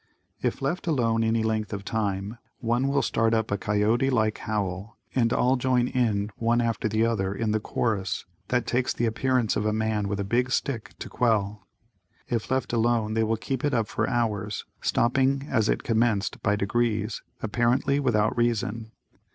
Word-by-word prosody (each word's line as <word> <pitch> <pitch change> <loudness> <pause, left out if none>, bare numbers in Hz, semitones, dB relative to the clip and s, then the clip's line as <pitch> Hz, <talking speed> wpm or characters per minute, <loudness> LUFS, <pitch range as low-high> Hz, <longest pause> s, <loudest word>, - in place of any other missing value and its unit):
If - - -1
left 175 +7 -2
alone 115 -7 +2
any 115 0 +1
length 110 -1 -1
of 100 -1 -5
time, 105 +1 -2 0.2
one 120 +3 0
will 140 0 +1
start 115 0 +2
up 110 -1 -1
a 100 - +1
coyote 110 +6 +2
like 110 -4 +1
howl 100 -1 -3 0.2
and 115 -3 +2
all 125 +2 +3
join 125 -1 +2
in 105 -5 0
one 115 +1 +2
after 115 -2 0
the 110 +2 +2
other 100 -4 0
in 110 0 -1
the 110 - +1
chorus 105 -3 -2 0.2
that 125 -1 +1
takes 125 +1 0
the 120 - 0
appearance 120 0 +1
of - - 0
a - - +2
man 110 -1 0
with 100 0 -2
a - - 0
"big 120 +6 +1
stick" 130 -3 -2
to - - -7
quell. 105 -4 0 0.6
If 115 -2 -2
left 130 -1 -1
alone 115 -2 +1
they 110 - +1
will 110 +1 0
keep 130 +3 -3
it 145 -3 +1
up 115 -3 +1
for - - -1
hours, 105 -5 -1 0.2
stopping 135 +3 +2
as 110 -4 +2
it - - 0
commenced 110 -3 +1
by 105 -1 +2
degrees, 110 +1 0 0.2
apparently 120 +5 +1
without 115 -6 +2
reason. 115 -1 -1
115 Hz, 180 wpm, -26 LUFS, 105-120 Hz, 0.6 s, all